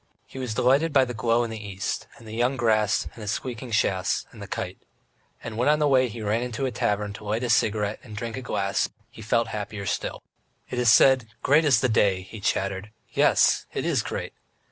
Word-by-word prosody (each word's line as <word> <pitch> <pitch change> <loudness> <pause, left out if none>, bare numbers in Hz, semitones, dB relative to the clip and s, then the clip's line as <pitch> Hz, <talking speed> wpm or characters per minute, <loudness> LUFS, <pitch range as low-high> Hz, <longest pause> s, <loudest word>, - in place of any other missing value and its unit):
He 130 - -10
was 125 -4 -3
delighted 140 +7 +3
by 135 -2 +5
the 125 - -5
glow 115 +1 +1
in 115 - -4
the 110 -1 -6
east, 100 -1 -4
and 115 - -14
the 110 - -8
young 125 +4 +1
grass, 110 -4 +2
and 115 - -12
his 105 - -4
squeaking 120 +2 -4
chaise, 95 -4 +1
and - - -13
the - - -7
kite.... - - -5 0.6
And 115 -2 -6
when 125 +5 +2
on 150 - +4
the 150 -1 +2
way, 130 -2 +4
he 115 -1 -7
ran 105 +3 0
into 125 +1 -3
a 130 - -1
tavern 105 -2 -1
to 105 - -10
light 110 +3 -2
his 120 -2 +3
cigarette 105 -1 +1
and 110 -3 -10
drank 115 +1 -4
a 130 - -5
glass, 100 -5 -1 0.2
he 115 - -12
felt 115 +1 +1
happier 105 -1 -5
still. - - -3 0.5
"It 125 - -2
is 120 -2 +5
said, 130 0 +5 0.2
'Great 150 +4 +4
is 130 -6 +4
the 130 - +3
day,'" 100 -5 +2
he 105 +3 -10
chattered. 100 0 -1 0.2
"Yes, - - +3
it - - -2
is - - +2
great! - - -5
115 Hz, 225 wpm, -25 LUFS, 105-125 Hz, 0.6 s, by